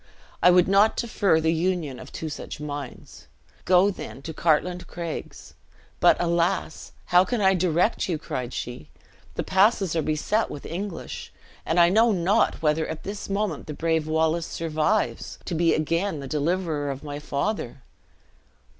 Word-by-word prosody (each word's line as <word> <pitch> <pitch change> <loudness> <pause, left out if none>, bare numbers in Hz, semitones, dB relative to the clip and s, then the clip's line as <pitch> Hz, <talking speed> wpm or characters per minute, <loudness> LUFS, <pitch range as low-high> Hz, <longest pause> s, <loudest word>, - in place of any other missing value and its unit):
"I - - +7
would 180 0 +5
not 200 +3 +4
defer 200 -8 +2
the 160 0 +1
union 165 -5 -1
of - - -11
two 160 - -5
such 150 - -7
minds. 145 -3 -8 0.4
Go, 185 +2 +5
then, 140 -7 -9
to 160 - -6
the - - -12
Cartlane 175 +2 +1
Craigs. 170 -2 -7 0.5
But, - - +5
alas! 170 +2 -1 0.2
how 180 +1 +8
can 230 +5 -2
I 190 -1 +4
direct 180 +3 +1
you?" 170 - 0
cried 125 -5 -5
she. 120 -13 -6 0.5
"The - - -2
passes 195 -2 +3
are 165 - +2
beset 155 +9 0
with 145 - -8
English; 180 +1 -6 0.4
and 165 +2 +2
I 170 0 +7
know 225 +5 +4
not 190 -1 +1
whether 155 +1 +2
at 160 0 -6
this 200 0 -6
moment 200 +1 -2
the 150 - -5
brave 160 -1 0
Wallace 160 +1 +1
survives, 165 +6 -1
to - - -4
be 165 0 +3
again 165 +2 -1
the 140 - -6
deliverer 155 0 -1
of 135 +1 -5
my 145 -1 -5
father!" 140 - -3
170 Hz, 165 wpm, -25 LUFS, 155-190 Hz, 0.5 s, how